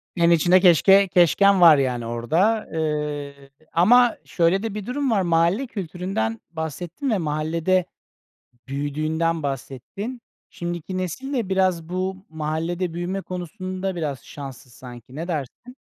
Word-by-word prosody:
Yani 170 -1 +4
içinde 175 +3 +5
keşke 195 +3 +6
keşken 185 +2 +4
var 165 -3 +9
yani 125 -3 -1
orada, 160 - 0
eee, 150 -3 -3 0.2
ama 235 +7 +5
şöyle 175 +4 +1
de 225 -3 -3
bir 210 -2 -5
durum 270 +1 -1
var, 205 -4 +2
mahalle 170 +8 +2
kültüründen 180 - -3
bahsettin 170 - -4
ve 215 - +2
mahallede 165 +3 0 0.8
büyüdüğünden 155 +4 -1
bahsettin. 140 - -5 0.3
Şimdiki 175 +2 -5
nesil 225 - -4
de 235 -8 -1
biraz 185 -4 +1
bu 185 +1 -2
mahallede 160 +3 -3
büyüme 180 +3 -3
konusunda 185 +1 -5
biraz 145 -6 -4
şanssız 135 -3 -10
sanki. 125 +1 -12
Ne 165 +3 -5
dersin? 175 - -5
170 Hz, 130 wpm, -23 LUFS, 150-190 Hz, 0.8 s, var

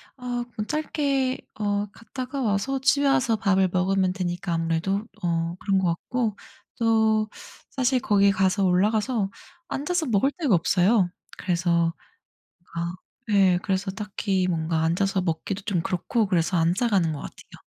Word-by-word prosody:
아 245 -2 -3
그건 215 -3 -5
짧게 280 -4 0 0.2
어 205 -1 0
갔다가 255 +5 -6
와서 235 +4 0
집에 280 +2 +3
와서 265 -4 +3
밥을 195 -3 +2
먹으면 185 0 +2
되니까 175 -1 -3
아무래도 165 +5 0 0.2
어 170 -1 -1
그런 195 -1 +1
것 190 -2 +1
같고 215 +5 -2 0.4
또 220 -1 +3 0.4
사실 260 0 +1
거기 200 -3 +4
가서 195 +1 +1
올라가서 210 +4 +2 0.4
앉아서 320 +4 -1
먹을 245 +3 +2
데가 280 - +3
없어요. 180 +3 +3 0.3
그래서 170 -2 +1 0.8
어 170 +1 -2 0.4
예 190 -3 +4
그래서 190 0 -1
딱히 195 -2 -1
뭔가 160 -1 0
앉아서 190 +4 +1
먹기도 180 +3 -2
좀 190 -4 -1
그렇고 200 +6 0
그래서 180 -1 +1
안 165 +1 +3
싸 240 +4 +1
가는 185 -6 +2
것 145 - -6
같아요. - - -12
200 Hz, 295 characters per minute, -25 LUFS, 180-235 Hz, 0.8 s, 거기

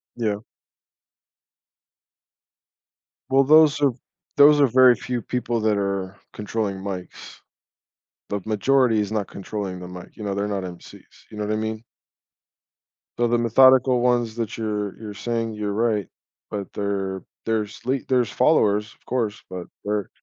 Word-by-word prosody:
Yeah. 105 -4 -1 2.9
Well, 135 +1 +5
those 155 +1 +6
are 140 -3 +3 0.5
those 145 +1 +7
are 140 - +6
very 125 0 +6
few 125 -1 -4
people 120 0 -2
that 110 -1 +2
are 100 -1 -2 0.2
controlling 105 -2 -3
mics. 95 -2 -8 0.9
The 100 - -2
majority 115 +1 +2
is 105 - -2
not 105 -3 -1
controlling 100 -2 -5
the 90 - -8
mic, 90 0 -11
you - - -9
know, 100 -1 -2
they're 100 +1 -1
not 100 -2 -2
MCs, 90 -1 -10 0.3
you 105 - -11
know 105 - -3
what 105 - -2
I - - 0
mean? 110 0 -3 1.3
So 120 0 +2
the 120 - +2
methodical 130 +2 +5
ones 120 -2 +1
that 115 -1 -4
you're 105 -3 -3
you're 110 -2 -7
saying 115 +2 -3
you're 105 -1 -3
right, 110 -3 0 0.4
but 100 -2 -5
there 95 -2 -3 0.2
there's 110 -2 -2
le 130 +2 +1
there's 125 -3 +1
followers, 105 -7 +2
of - - -31
course, 115 -5 -2
but 90 -1 -7 0.2
they're 105 -1 -2
110 Hz, 150 wpm, -23 LUFS, 100-120 Hz, 2.9 s, those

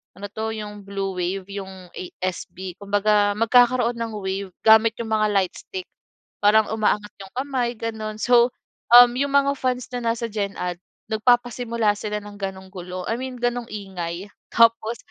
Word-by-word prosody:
ano 200 +2 -7
'to, 220 +1 -3
'yong 210 -1 -7
blue 195 -1 -4
wave 185 +2 -2
'yong 190 -2 -8
ASB. 185 0 -6
Kumbaga, 205 0 +2
magkakaroon 245 +1 +4
ng 230 -1 -4
wave 190 -1 -4
gamit 220 0 +7
'yong 225 -1 -4
mga 215 -1 +3
lightstick. 200 - -2 0.5
Parang 210 +1 +5
umaangat 210 -1 0
'yong 195 -1 -11
kamay 255 -2 -1
gano'n, 220 -1 -4
so, 245 0 +5 0.4
um, 245 0 +10
'yong 280 +1 0
mga 280 0 +4
fans 255 -1 -1
na 235 -2 0
nasa 230 0 -4
Gen 200 -2 -2
Ad 180 -1 -3 0.3
nagpapasimula 235 -1 +2
sila 210 0 -3
ng 205 0 -10
gano'ng 190 -1 -5
gulo. 180 -1 -6
I 225 - +1
mean 260 0 -5
gano'ng 245 -1 0
ingay 190 -2 -5 0.2
tapos, 230 0 +4
215 Hz, 155 wpm, -23 LUFS, 195-235 Hz, 0.5 s, um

